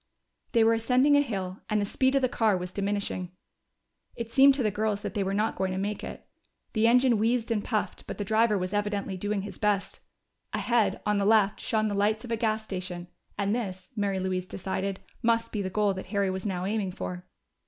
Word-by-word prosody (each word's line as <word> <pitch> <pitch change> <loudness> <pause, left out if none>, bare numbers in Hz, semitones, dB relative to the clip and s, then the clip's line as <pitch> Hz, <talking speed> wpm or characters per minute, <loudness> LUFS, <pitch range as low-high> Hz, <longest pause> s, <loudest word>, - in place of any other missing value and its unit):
They 230 -2 +5
were 225 +1 +5
ascending 250 +5 +4
a 285 - +6
hill, 195 -8 -4
and 210 -1 +2
the 205 - +1
speed 260 +6 +1
of 275 - +2
the - - +5
car 220 -5 +2
was 180 0 -5
diminishing; 200 -2 -2 0.8
it 230 -1 -5
seemed 270 +3 +7
to 265 - 0
the 215 - +2
girls 210 0 -1
that - - -4
they 205 - 0
were 190 - -1
not 215 +2 +1
going 190 0 -1
to - - -3
make 205 +2 -2
it. - - -7 0.5
The 220 0 +3
engine 245 -1 +4
wheezed 230 +1 +1
and 210 -3 0
puffed, 215 -3 -2
but - - -5
the 205 - -3
driver 220 +1 +3
was 185 +1 -3
evidently 205 -2 -1
doing 205 +1 -2
his 200 -1 -8
best. 205 -2 0 0.5
Ahead, 220 -5 +1
on 210 -1 +2
the - - +1
left, 210 -1 +4
shone 215 -1 0
the 205 - -1
lights 215 +3 +1
of 240 - -7
a - - +2
gas 220 -1 0
station, 180 -3 -5 0.3
and 200 0 +1
this, 190 -6 -4
Mary 200 -3 0
Louise 185 -1 -2
decided, 190 +1 -3 0.2
must 230 0 +1
be 210 - -2
the 190 - -2
goal 205 +1 +1
that 190 - -7
Harry 200 -1 0
was 190 +2 -3
now 185 -2 -2
aiming 200 -2 -1
for. 90 - -6
205 Hz, 220 wpm, -28 LUFS, 190-225 Hz, 0.8 s, seemed